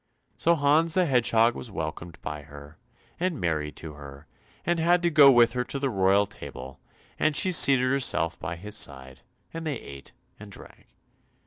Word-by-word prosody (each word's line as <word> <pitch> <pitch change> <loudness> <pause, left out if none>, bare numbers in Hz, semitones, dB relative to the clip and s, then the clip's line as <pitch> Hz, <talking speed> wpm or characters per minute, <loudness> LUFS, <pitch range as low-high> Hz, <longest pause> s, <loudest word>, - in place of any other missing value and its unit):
So 170 +1 +2
Hans 155 +2 +2
the 185 -1 +3
Hedgehog 120 -4 +2
was 120 - -8
welcomed 85 -2 -7
by 75 0 -6
her, 75 +1 -14 0.4
and 175 -3 -2
married 75 -3 -2
to 80 -2 -9
her, 70 0 -12 0.4
and 175 0 0
had 175 +2 +2
to 170 - +1
go 145 -3 +7
with 120 -2 +4
her 125 -1 -1
to 140 - -6
the 135 -1 -2
royal 100 0 +2
table, 70 - -10 0.4
and 155 - +1
she 185 +4 +3
seated 135 -6 +5
herself 105 -11 0
by 85 -1 -5
his 105 +5 -9
side, 65 -7 -5 0.3
and 165 0 -6
they 145 -4 -2
ate 70 -1 -12 0.3
and 105 -1 -12
drank. - - -13
110 Hz, 180 wpm, -26 LUFS, -, 0.4 s, go